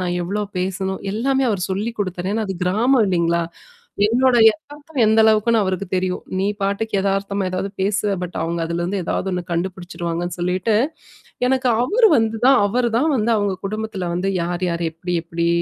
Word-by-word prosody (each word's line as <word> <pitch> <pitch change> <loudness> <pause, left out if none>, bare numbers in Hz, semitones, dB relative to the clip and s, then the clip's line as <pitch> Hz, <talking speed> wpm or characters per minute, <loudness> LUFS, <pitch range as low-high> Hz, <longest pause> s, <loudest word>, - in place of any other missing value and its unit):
நா - - -1 0.2
எவ்வளோ 200 +4 -2 0.2
பேசணும்? 190 +1 -2
எல்லாமே 265 +4 +1
அவரு 200 -4 -1
சொல்லிக் 215 +4 -3
குடுத்தாரு. 185 -1 -2
ஏன்னா 220 - 0
அது 190 - -2
கிராமம் 230 +7 +3
இல்லீங்களா? 170 -2 +1 0.6
என்னோட 250 +3 +3 0.2
எதார்த்தம் 295 -1 -8
எந்த 220 +1 +4
அளவுக்குன்னு 220 +1 +4
அவருக்குத் 190 -1 -3
தெரியும். 185 0 -1 0.2
நீ 195 - +1 0.2
பாட்டுக்கு 200 +3 -1
எதார்த்தமா 200 0 -1
எதாவது 185 +2 -3
பேசுவ. 205 +1 +1
பட் 180 0 -5
அவுங்க 170 +1 -2
அதுலருந்து 175 +4 -2
எதாவது 190 - -2
ஒண்ணு 180 -1 -2
கண்டுபுடிச்சுடுவாங்கன்னு 175 -1 -3
சொல்லீட்டு, 185 +5 0 0.7
எனக்கு 260 0 +1 0.2
அவரு 445 - +4
வந்து 225 -1 0
தான் 270 -1 +6
அவரு 240 +3 0
தான் 310 +5 +2
வந்து 230 +1 +1
அவங்க 205 -2 0
குடும்பத்துல 215 -4 -4
வந்து, 190 +3 -1
"யார் 175 +1 -2
யார், 170 0 -2
எப்படி 175 +2 -4
எப்படி, 170 0 -1
195 Hz, 165 wpm, -20 LUFS, 180-225 Hz, 0.7 s, தான்